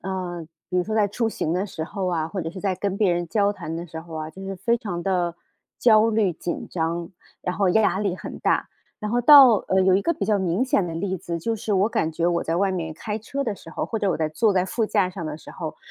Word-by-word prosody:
呃， 180 -3 -4 0.2
比 180 - -1
如 180 - +2
说 215 +2 -3
在 210 -2 +3
出 225 +3 -1
行 160 -6 -2
的 185 +3 0
时 160 -5 -6
候 195 +3 -4
啊， 165 -3 -1
或 190 0 -4
者 165 - -3
是 185 +2 -8
在 190 -3 -1
跟 200 -1 -2
别 200 -4 +3
人 175 0 -1
交 205 +3 +2
谈 170 -5 -6
的 170 - -4
时 165 -1 -8
候 165 0 -11
啊， 155 0 -4
就 190 - -12
是 195 - -4
非 230 +6 0
常 180 -8 -4
地 175 -2 0 0.5
焦 220 -1 +6
虑、 215 -4 +2
紧 170 +1 -5
张， 165 0 -2 0.3
然 180 - -2
后 195 -2 +2
压 210 0 +3
力 200 -3 0
很 - - -8
大。 - - +1 0.3
然 210 -1 -3
后 240 - +2
到 260 -3 +9
呃， 190 0 +3
有 185 0 +4
一 195 - +3
个 335 +10 0
比 320 - -2
较 210 -2 +2
明 190 +5 +1
显 260 -9 +1
的 165 - -5
例 190 +3 -2
子， 170 0 -4
就 225 +7 -1
是 215 -1 -2
我 195 +2 +3
感 160 - 0
觉 165 +2 -1
我 175 -1 +1
在 165 - -1
外 195 +1 +2
面 160 -4 -3
开 210 +5 -4
车 275 +6 -4
的 220 - -2
时 175 - -14
候， - - -3
或 225 - -3
者 205 -2 0
我 180 - +1
在 155 -1 -1
坐 210 +8 +2
在 185 -2 +2
副 220 +4 -1
驾 200 -4 +1
上 175 -4 -6
的 150 - -4
时 155 - -13
候， 160 -3 -6
190 Hz, 300 characters per minute, -24 LUFS, 170-210 Hz, 0.5 s, 到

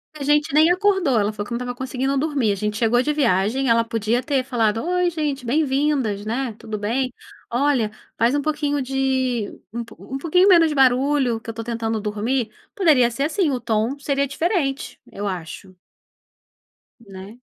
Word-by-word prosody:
A 300 - -10
gente 295 +1 +2
nem 315 +3 +5
acordou, 370 - +2
ela 205 +1 0
falou 210 - -4
que - - -14
não 235 - -1
estava 245 0 -4
conseguindo 260 +2 -2
dormir, 280 -7 0
a - - 0
gente 210 +2 -3
chegou 240 +2 +3
de 295 - 0
viagem, 250 -2 +1
ela 230 -1 +4
podia 230 +1 -1
ter 275 -3 0
falado: 225 -4 0
"Oi 360 0 +1
gente, 300 -5 -3
bem-vindas, 270 -5 0
né. 235 +3 -2
Tudo 220 -1 -5
bem? 245 +5 -1 0.4
Olha, 245 -3 +1 0.2
faz 235 +4 +2
um 290 - +1
pouquinho 295 -1 -1
de 260 -4 -1 0.2
um 235 0 -3 0.4
pouquinho 360 +5 +3
menos 340 -4 +6
de 300 - -3
barulho 265 -2 +3
que 235 - -10
eu - - -1
estou 225 0 -7
tentando 225 -1 -2
dormir", 215 +3 -2 0.2
poderia 300 - +4
ser 240 +4 -3
assim, 330 +3 +1
o 260 -3 -1
tom 230 +3 -1
seria 280 0 0
diferente, 285 -2 -2
eu 205 +1 -4
acho. 185 +1 -7 1.3
Né. 200 +1 -11
255 Hz, 175 wpm, -22 LUFS, 225-290 Hz, 1.3 s, menos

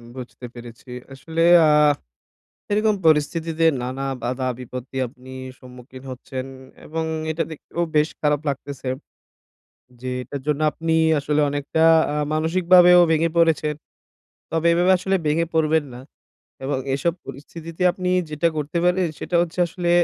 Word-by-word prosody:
বুঝতে 125 -1 -9
পেরেছি। 120 +1 -12 0.2
আসলে 160 +5 -4 0.2
আ - - +5 1.0
এরকম 215 +1 +2
পরিস্থিতিতে 160 +1 +2 0.2
নানা 130 +2 -4 0.2
বাধা 130 +2 -2
বিপত্তি 125 +1 -7
আপনি 130 +1 -15 0.3
সম্মুখীন 125 +1 -13
হচ্ছেন 130 0 -6 0.4
এবং 160 +1 -3 0.3
এটা 165 +1 -1
দেখতেও 170 +2 -4
বেশ 150 +1 +3
খারাপ 150 -1 +2
লাগতেছে। 140 -1 -5 1.1
যে 130 - -6
এটার 140 +2 -7
জন্য 150 0 0
আপনি 165 0 -1 0.2
আসলে 145 +1 0
আ - - +1
অনেকটা 145 +2 -1 0.5
মানসিকভাবেও 175 +2 +5
ভেঙে 165 +1 +2
পড়েছেন। 155 -2 +2 0.8
তবে 165 +1 0
এভাবে 175 +2 +3
আসলে 190 +1 0
ভেঙে 160 +3 +1
পড়বেন 160 -1 +2
না। 125 - -9 0.6
এবং 135 0 -1 0.2
এসব 165 +5 0
পরিস্থিতিতে 160 +5 -8
আপনি 185 -1 -4 0.2
যেটা 150 +3 +1
করতে 150 +3 -2
পারেন 180 0 +2
সেটা 175 - -2
হচ্ছে 175 +1 -6
আসলে 170 +1 -3
155 Hz, 130 wpm, -22 LUFS, 135-165 Hz, 1.1 s, আ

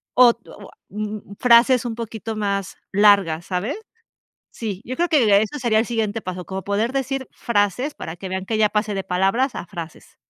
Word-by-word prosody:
o 245 -1 +7
to 230 - -18 0.2
ah - - -23
mm 210 0 -6
frases 245 +1 +5
un 230 - -3
poquito 225 -1 -5
más 200 -3 -2
largas, 195 -5 +4
¿sabes? 200 - -2 0.7
Sí, 205 -4 -5
yo 255 - -4
creo 345 +3 0
que 215 -10 +5
eso 220 +7 -3
sería 225 -3 +2
el 225 - +1
siguiente 225 -1 -2
paso, 180 -2 -6
como 190 0 -5
poder 215 +6 -1
decir 270 -1 -2
frases 235 +6 0
para 160 - -7
que 185 +1 -7
vean 190 0 -3
que 220 +2 -1
ya 215 -1 +4
pasé 210 0 -1
de 195 -1 -3
palabras 195 +9 +1
a - - -5
frases. 170 -3 -9
215 Hz, 190 wpm, -22 LUFS, 195-235 Hz, 0.7 s, o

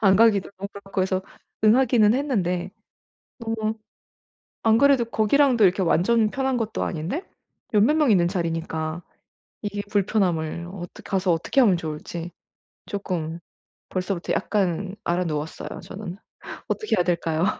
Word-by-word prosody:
안 195 -3 +5
가기도 215 -2 +4
그렇고 200 +1 -9
그래서 185 0 0 0.4
응하기는 230 -1 +5
했는데 190 -10 -1 0.8
음 220 -1 -1 0.9
안 225 0 +5
그래도 275 -2 +4
거기랑도 235 +2 +3
이렇게 190 0 +4
완전 215 +6 +3
편한 265 +1 0
것도 225 -2 -2
아닌데 180 - -3 0.5
열 210 - +5
몇 290 +9 +4
명 300 -6 +4
있는 175 -4 +4
자리니까 165 -2 -2 0.6
이게 205 -1 -3
불편함을 180 -5 0
어떻 175 -2 -9
가서 190 -2 +1
어떻게 165 +11 0
하면 215 -8 +6
좋을지 165 +1 -5 0.6
쪼끔 170 -5 -3 0.5
벌써부터 185 -1 -2
약간 195 -1 0
앓아 175 +1 0
누웠어요 155 -1 -4
저는. 190 -2 -7 0.5
어떻게 430 - 0
해야 180 - +3
될까요? 170 -1 0
195 Hz, 305 characters per minute, -24 LUFS, 175-225 Hz, 0.9 s, 하면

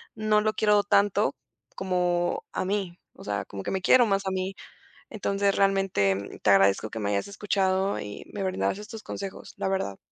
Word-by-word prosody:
no 215 -1 +2
lo 215 0 +1
quiero 210 -1 +3
tanto 200 -8 +2 0.4
como 180 -2 0
a - - -2
mí, 190 -3 -2
o - - -14
sea, 100 0 -3
como 100 -1 -7
que - - -3
me 190 - 0
quiero 245 +6 +6
más 195 -2 0
a - - 0
mí. 190 +1 -2 0.6
Entonces 200 -2 0
realmente 190 - +1
te - - 0
agradezco 100 +2 +4
que 115 - -5
me 100 -1 -1
hayas 100 - -1
escuchado 195 -1 0
y 105 0 -8
me 205 - -4
brindaras 185 - -1
estos 215 +1 -9
consejos, 195 -2 -7
la - - -1
verdad. 190 - -2
190 Hz, 185 wpm, -27 LUFS, 135-200 Hz, 0.6 s, quiero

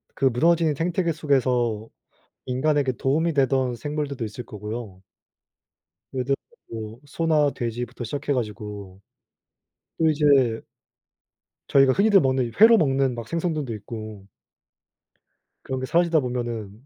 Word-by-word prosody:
그 135 - 0
무너진 160 +5 +3
생태계 170 +2 0
속에서 125 -7 0 0.6
인간에게 135 +1 +1
도움이 155 +7 0
되던 130 -3 +1
생물들도 145 0 -4
있을 110 +3 -7
거고요. 105 -3 -7 1.1
예를 130 -1 -2
들어서 135 +1 +1 0.3
뭐 110 +1 -7
소나 155 -1 +1
돼지부터 120 -1 -5
시작해 140 +4 -2
가지고 105 -5 -5 1.0
또 160 - +2
이제 140 -6 +3 1.1
저희가 135 -2 +5
흔히들 200 -1 +5
먹는 130 -1 +1
이 115 - -6
회로 225 +2 +8
먹는 135 - +1
막 115 -1 -7
생선들도 160 -7 -2
있고 110 -1 -8 1.4
그런 130 -1 -4
게 130 - -3
사라지다 170 +1 +3
보면은 120 -3 -4
130 Hz, 280 characters per minute, -24 LUFS, 115-150 Hz, 1.4 s, 회로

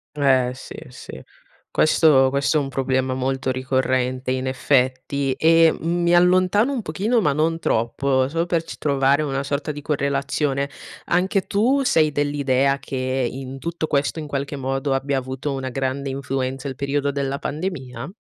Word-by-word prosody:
Eh 130 -4 +3
sì, - - -10
sì. - - -10 0.5
Questo 150 -4 +4
questo 140 +3 +1
è - - +4
un 140 - -3
problema 130 -1 0
molto 130 0 -1
ricorrente 130 0 -1
in 130 0 -2
effetti. 130 +1 0
E 165 +1 +5
mi 170 +1 +1
allontano 185 +8 +3
un 250 - -2
pochino 220 +3 0
ma 150 - +2
non 160 +3 0
troppo, 130 +2 +1
solo 165 +4 -1
per 170 -2 0
c - - -9
trovare 140 0 +2
una 135 -2 -2
sorta 140 +2 -2
di 145 -1 -8
correlazione. 140 -1 -1 0.4
Anche 185 +3 +1
tu 255 +7 +2
sei 155 -10 +3
dell'idea 140 -2 +1
che 135 - -7 0.4
in 135 0 -7
tutto 170 0 -3
questo, 145 +1 0
in 155 - -4
qualche 140 0 -3
modo, 135 +1 -2
abbia 135 0 0
avuto 130 +2 -4
una 135 -1 -4
grande 135 +1 -2
influenza 135 0 -3
il 135 - -5
periodo 140 +1 -1
della 140 0 -2
pandemia? 145 -5 -5
140 Hz, 160 wpm, -22 LUFS, 130-155 Hz, 0.5 s, E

